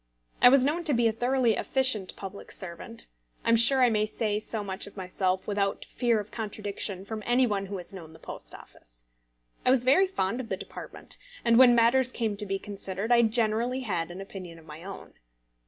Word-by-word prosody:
I 245 - +9
was 260 0 +5
known 320 +5 0
to 295 -5 +3
be 235 0 +3
a - - +2
thoroughly 245 +1 +1
efficient 260 -6 +1
public 195 0 -9
servant; 170 - -4 0.4
I - - +1
am 230 - +6
sure 255 +3 +6
I 245 - +4
may 215 -1 +1
say 210 -1 -1
so 215 0 -4
much 190 -1 -4
of 205 - -14
myself 185 0 -1
without 200 -1 -1
fear 235 -3 0
of 210 0 -8
contradiction 205 -3 -4
from 220 +1 -6
any 245 +3 +3
one 200 -4 -2
who 200 0 -5
has 180 +2 -9
known 165 -4 -10
the - - -13
Post - - -9
Office; - - -13 0.6
I - - +3
was 255 -1 +4
very 320 +10 +4
fond 235 - -2
of 230 - -10
the 190 - -2
department, - - -9 0.3
and 235 0 +5
when 250 -2 +7
matters 240 +2 +3
came 225 -4 -2
to 210 0 -1
be 195 0 -1
considered, 195 +2 -5
I 240 0 +6
generally 230 +2 +1
had 180 -9 -2
an 180 +2 -8
opinion 185 -4 -9
of 160 - -16
my 155 +1 -11
own. 195 0 -10
215 Hz, 210 wpm, -27 LUFS, 195-240 Hz, 0.6 s, I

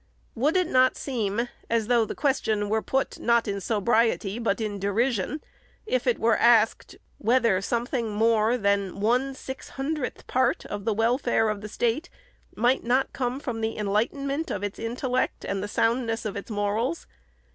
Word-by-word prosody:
Would 290 +9 +1
it 365 - +3
not 260 -5 +3
seem, 235 -3 -2 0.2
as 230 -1 +1
though 235 -1 +3
the - - -6
question 220 -7 0
were 220 +1 +1
put, 265 +4 -1
not 235 -1 +2
in 200 -1 -2
sobriety, 220 0 +1
but 230 -3 0
in 210 -2 -3
derision, 225 +7 0 0.4
if - - -1
it - - +3
were 230 0 +3
asked, 230 -2 +3 0.2
whether 230 -4 +3
something 235 +2 -1
more 220 +2 +2
than 200 -3 0
one 250 +6 +1
six 265 0 -8
hundredth 280 -1 -4
part 255 -1 +1
of 205 -1 -6
the 225 - +2
wel 230 +4 +2
fare 225 -4 +1
of 210 -1 -3
the 210 - -7
State 240 +10 -1 0.5
might 245 +4 +2
not 255 +3 +1
come 255 0 -2
from 245 -6 -4
the 220 0 -2
enlightenment 275 +9 -1
of 200 - -3
its 205 -1 -4
intellect 250 +2 -2
and 195 -1 -2
the 205 - -3
soundness 225 +1 0
of 210 - -3
its 200 - -6
morals 215 +8 -1
230 Hz, 170 wpm, -26 LUFS, 210-255 Hz, 0.5 s, it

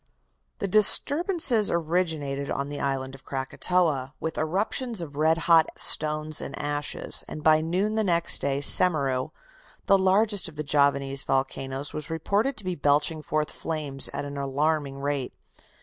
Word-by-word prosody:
"The 200 - -4
disturbances 255 - +6
originated 160 -5 -3
on 140 +1 -4
the 145 - -7
island 135 -1 -4
of 135 - -14
Krakatoa, 140 +1 -2
with 160 0 -5
eruptions 205 - -3
of 155 -4 -8
red 160 +2 +1
hot 165 -2 +4
stones 155 0 +3
and - - -8
ashes, 145 0 -3
and 155 - -9
by 155 0 +3
noon 185 +6 -2
next 170 -3 +1
day 140 0 -2
Semeru, 140 -6 +3 0.6
the 195 0 +3
largest 200 +1 +2
of 155 - -17
the 150 - -5
Javanese 140 -2 0
volcanoes, 135 +1 -3
was 150 -1 -7
reported 200 - -2
to 215 - -3
be 185 - -3
belching 150 0 0
forth 150 0 -3
flames 150 -4 -3
at 145 - -6
an 140 0 -8
alarming 140 +1 -2
rate. 140 -2 -4
155 Hz, 150 wpm, -24 LUFS, 140-180 Hz, 0.6 s, disturbances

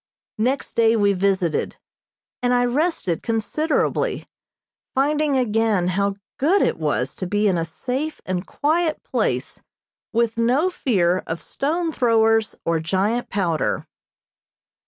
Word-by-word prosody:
Next 255 +5 -1
day 230 0 +4
we 205 -2 +3
visited, 190 -3 0 0.7
and 250 0 +2
I 245 0 +3
rested 245 - 0
considerably, 235 +8 -1 0.7
finding 295 +1 +2
again 220 -6 +1
how 200 +2 0 0.2
good 350 +9 +3
it - - 0
was 145 -4 -1
to 185 - -3
be 210 +3 +1
in 190 - +2
a 165 - 0
safe 260 - -4
and 185 -1 -2
quiet 315 +1 0
place - - -2 0.5
with 235 0 0
no 265 +10 +2
fear 185 - +1
of 165 +1 -3
stone 325 +4 -2
throwers 225 -4 +2
or 165 -1 +1
giant 195 +8 0
powder. 175 -6 -1
225 Hz, 125 wpm, -22 LUFS, 185-275 Hz, 0.7 s, day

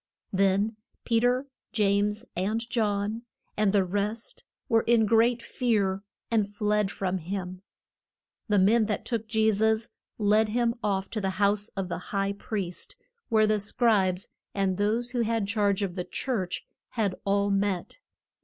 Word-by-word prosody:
Then 195 +3 +2 0.3
Pe 230 -1 +3
ter, 250 +3 +2 0.3
James 210 +1 +1
and 215 +6 -1
John, 210 -1 0 0.3
and 210 -2 +2
the 200 -1 +3
rest, 205 +4 -3 0.2
were 225 -4 +4
in 230 -1 +3
great 230 +2 +3
fear, 200 -6 0 0.3
and 210 -3 +1
fled 210 -1 +1
from 190 -1 -2
him. 185 +1 -5 0.9
The 205 - +3
men 215 +3 +4
that 210 - -2
took 225 -3 -2
Je 220 0 +3
sus 220 +2 +2 0.3
led 215 +1 +3
him 235 +1 +1
off 195 -2 -1
to 215 - -2
the 195 - 0
house 205 +1 +2
of 195 -1 -1
the 175 - -4
high 195 +2 -2
priest, 200 -3 -4 0.3
where 220 -2 +4
the 215 0 +2
scribes 200 -3 +2 0.3
and 195 -1 0
those 225 +4 0
who 245 -2 0
had 225 -2 0
charge 205 -1 +1
of 190 -3 -2
the 180 -1 -3
church 190 -2 -3 0.3
had 210 -5 0
all 200 0 +1
met. 195 - -1
210 Hz, 155 wpm, -27 LUFS, 195-225 Hz, 0.9 s, were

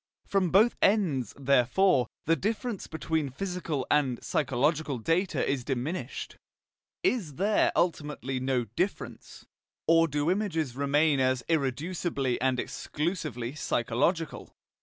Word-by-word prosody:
From 195 -3 +1
both 210 +7 +5
ends, 165 - +2
therefore, 140 - +3 0.2
the 165 - +4
difference 215 - -3
between 160 -1 -2
physical 165 -2 -3
and 135 -5 +2
psychological 150 +1 0
data 165 - 0
is 135 -3 0
diminished. 135 +7 -4 0.7
Is 225 - 0
there 205 +6 +2
ultimately 150 -6 -1
no 130 -1 0
difference, 175 - -4 0.4
or 165 0 +5
do 145 +2 0
images 165 - -1
remain 145 +1 +2
as 130 -1 +1
irreducibly 145 -2 -1
and 130 -1 +1
exclusively 150 - -3
psychological? 150 +5 -1
150 Hz, 110 wpm, -28 LUFS, 130-180 Hz, 0.7 s, both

